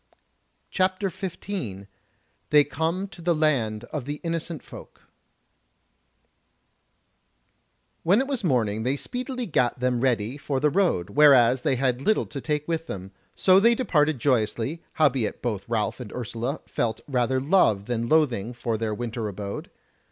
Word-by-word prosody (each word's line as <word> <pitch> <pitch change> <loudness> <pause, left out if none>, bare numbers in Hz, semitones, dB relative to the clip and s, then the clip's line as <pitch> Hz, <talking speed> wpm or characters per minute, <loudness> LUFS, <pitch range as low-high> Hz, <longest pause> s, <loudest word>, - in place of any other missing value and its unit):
CHAPTER 185 0 0
15 170 - -5 0.6
They 150 -1 +6
Come 165 +7 -2
to 180 - -11
the 170 0 +1
Land 120 -9 +1
of 145 -5 -3
the 145 +1 -3
Innocent 165 -1 -3
Folk - - -13 3.0
When 190 +6 +4
it 265 - +1
was 270 -5 -3
morning 110 - +1
they 130 +5 0
speedily 250 - -4
gat 125 - 0
them 125 -1 0
ready 120 -1 0
for 140 -2 -2
the 150 +2 +2
road, 170 - +1
whereas 130 -4 +6
they 130 - +1
had 130 0 0
little 215 +9 +2
to 140 - -7
take 150 0 -2
with 165 -1 -2
them; 95 0 -6 0.2
so 185 0 +5
they 235 +3 +5
departed 155 - +2
joyously, 125 +4 0
howbeit 135 -7 +1
both 110 -4 -3
Ralph 110 0 -1
and 120 -5 -8
Ursula 120 +4 -4
felt 110 -2 -2
rather 130 -1 +1
love 130 - +3
than 115 0 -2
loathing 125 -8 +2
for 115 -2 -3
their 110 -2 -1
winter 115 -1 -4
abode. 100 0 -6
135 Hz, 145 wpm, -25 LUFS, 115-165 Hz, 3.0 s, They